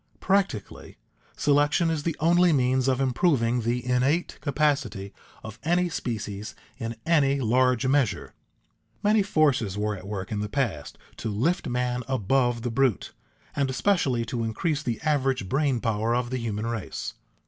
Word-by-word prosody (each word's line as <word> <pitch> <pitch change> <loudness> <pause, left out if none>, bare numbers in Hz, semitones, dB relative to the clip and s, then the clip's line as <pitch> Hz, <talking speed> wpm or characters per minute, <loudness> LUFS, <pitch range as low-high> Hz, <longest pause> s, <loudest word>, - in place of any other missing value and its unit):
Practically, 195 - -1 0.4
selection 145 +3 +2
is 160 -2 -1
the 165 +1 -2
only 175 +2 +4
means 130 -2 +2
of 130 -1 +2
improving 125 -3 +2
the 120 +2 -1
innate 130 +7 0
capacity 140 -9 -1 0.3
of 110 0 -9
any 175 +2 +1
species 105 -7 -5 0.2
in 115 -1 -4
any 140 -4 +3
large 125 +1 +2
measure. 130 -9 +1 0.7
Many 210 +1 +4
forces 145 - +1
were 105 0 -1
at 95 0 -10
work 100 -2 -5
in 105 - -1
the 105 0 -3
past 115 - -2 0.2
to 115 - -4
lift 130 - 0
man 125 0 -1
above 120 0 +1
the 120 - -2
brute, 130 -3 0 0.4
and 140 -2 +1
especially 130 -5 +1
to 115 0 -3
increase 145 +7 -1
the 120 -6 -3
average 135 -8 0
brain 135 +1 +1
power 115 +1 0
of 120 0 -1
the 130 - -1
human 110 -2 -3
race. 115 -3 -4
125 Hz, 150 wpm, -26 LUFS, 115-145 Hz, 0.7 s, only